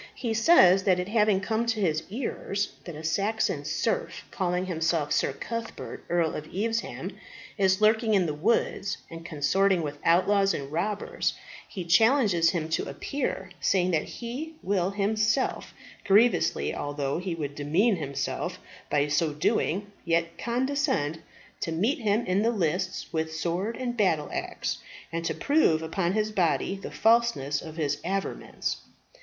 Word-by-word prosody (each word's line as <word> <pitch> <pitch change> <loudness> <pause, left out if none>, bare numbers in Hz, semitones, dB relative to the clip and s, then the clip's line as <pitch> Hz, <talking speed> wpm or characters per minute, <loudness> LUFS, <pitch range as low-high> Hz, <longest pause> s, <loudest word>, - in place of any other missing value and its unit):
He 235 -4 -2
says 215 - +6
that 185 -3 +4
it 180 +2 -3
having 210 -3 +3
come 225 +3 -1
to 225 -2 0
his 160 -6 +1
ears 200 -3 -3
that 170 - -7
a 155 - -8
Saxon 200 +7 0
serf, 485 -1 -2
calling 180 -1 -1
himself 165 -4 0
Sir - - +2
Cuthbert, 230 - -6
Earl 170 -2 +1
of 150 - -6
Evesham, 225 +6 -3 0.4
is 190 -1 +2
lurking 220 0 +4
in 190 -3 +3
the 155 - -1
woods 200 +3 0
and 165 0 -8
consorting 175 +4 +2
with 145 -1 -5
outlaws 195 +3 +3
and 140 0 -6
robbers, 200 +6 -1 0.3
he 185 -4 -6
challenges 200 -2 +4
him 165 -4 -1
to 160 - -1
appear, 190 - -3
saying 185 -1 +2
that 160 -3 +1
he 270 +7 -6
will 190 -2 +1
himself, 215 +4 0 0.3
grievously 220 +5 +3
although 145 +1 -2
he 180 -2 -3
would 145 -3 -4
demean 170 +10 +2
himself 140 -3 -3 0.3
by 145 0 +2
so 150 +2 +1
doing, 180 +6 0
yet 170 0 0
condescend 255 - 0 0.4
to 165 - -2
meet 210 - +1
him 215 0 +1
in 185 +2 +1
the 225 - +3
lists 185 -3 -1
with 160 0 -2
sword 180 +7 -2
and 245 -2 -3
battle 175 -8 +1
axe, - - -3 0.3
and 165 0 -3
to 160 - -1
prove 160 - +3
upon 170 +2 -1
his 215 0 0
body 185 0 +1
the 195 - -7
falseness 225 - +2
of 160 0 -9
his 145 -3 -1
averments. 195 +2 -3
190 Hz, 150 wpm, -27 LUFS, 160-220 Hz, 0.4 s, says